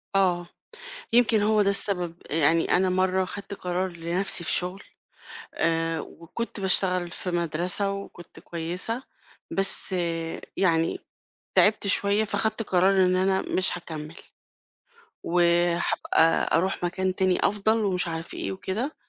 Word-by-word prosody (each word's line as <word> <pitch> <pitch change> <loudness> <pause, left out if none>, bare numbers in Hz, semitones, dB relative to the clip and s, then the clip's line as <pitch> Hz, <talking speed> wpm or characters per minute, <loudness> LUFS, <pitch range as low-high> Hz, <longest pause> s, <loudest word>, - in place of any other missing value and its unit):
آه، 180 -3 +2 0.7
يمكن 230 -3 +4
هو 215 0 +3
ده 200 - +2
السبب 180 -4 0 0.2
آآ - - -2
يعني 165 +2 +3
أنا 185 +1 +2
مرّة 185 0 +1
خدت 200 +2 -7
قرار 180 0 -2
لنفسي 170 +2 -1
في - - +1
شغل، 180 +2 +1 0.7
آآ 165 0 0
وكنت 210 +7 -7
باشتغل 185 -2 +1
في 180 - -5
مدرسة 175 +4 0
وكنت 195 -3 -9
كويسة، 180 +9 -3 0.5
بس 195 0 +1 0.6
يعني 165 -3 +1 0.6
تعبت 210 -1 +4
شوية 200 +2 +2
فخدت 220 +2 -1
قرار 190 0 +2
إن 185 - +2
أنا 190 +1 +1
مش 185 -1 0
هاكمّل، 160 -2 -8 1.1
وهابقى 170 -1 +2
أروح 185 +2 -1
مكان 185 +1 -1
تاني 185 -1 +1
أفضل 210 +2 +2
ومش 185 -2 +1
عارفة 165 0 -5
إيه - - -3
وكده، 210 +9 -4
185 Hz, 125 wpm, -25 LUFS, 170-200 Hz, 1.1 s, يمكن